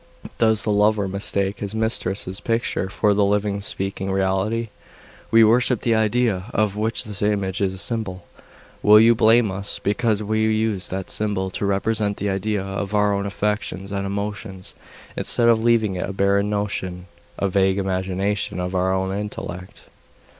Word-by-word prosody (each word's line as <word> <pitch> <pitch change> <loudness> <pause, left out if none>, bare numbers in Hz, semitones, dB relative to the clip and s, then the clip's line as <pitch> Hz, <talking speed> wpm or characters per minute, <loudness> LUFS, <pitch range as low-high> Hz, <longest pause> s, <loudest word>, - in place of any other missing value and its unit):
Does 110 -2 +3
the 105 - 0
lover 105 0 +2
mistake 100 +1 0
his 100 +1 -5
mistress's 100 -3 -1
picture 115 -4 -1
for 105 +1 +2
the 100 0 +2
living, 100 0 0
speaking 95 -1 -4
reality? 95 +4 0 0.6
We 115 0 +6
worship 120 +1 +3
the 115 - +1
idea 110 -3 +1
of 105 -2 +1
which 110 +2 -1
the 105 0 -1
image 100 -2 -2
is 95 -1 0
a - - -8
symbol. 95 -5 -3 0.6
Will 105 +1 +7
you 115 +2 +6
blame 115 -1 +4
us 100 +1 -3
because 105 0 0
we 110 +1 -1
use 110 -3 0
that 95 0 -5
symbol 100 -3 -1
to 100 - -2
represent 100 +1 0
the 100 0 -1
idea 100 +1 -1
to 100 +1 -4
our 105 0 +3
own 100 0 -1
affections 100 -1 -3
and 100 0 -2
emotions 100 -1 -5 0.4
instead 120 - +2
of 110 -1 +3
leaving 115 -4 +3
it 90 +2 -3
a - - -4
barren 100 +1 +2
notion, 95 -3 -3 0.3
a 100 - 0
vague 95 0 +2
imagination 95 +1 -1
of 90 +1 -3
our 95 0 +1
own 95 0 -1
intellect? 100 -2 -6
100 Hz, 165 wpm, -22 LUFS, 95-110 Hz, 0.6 s, Will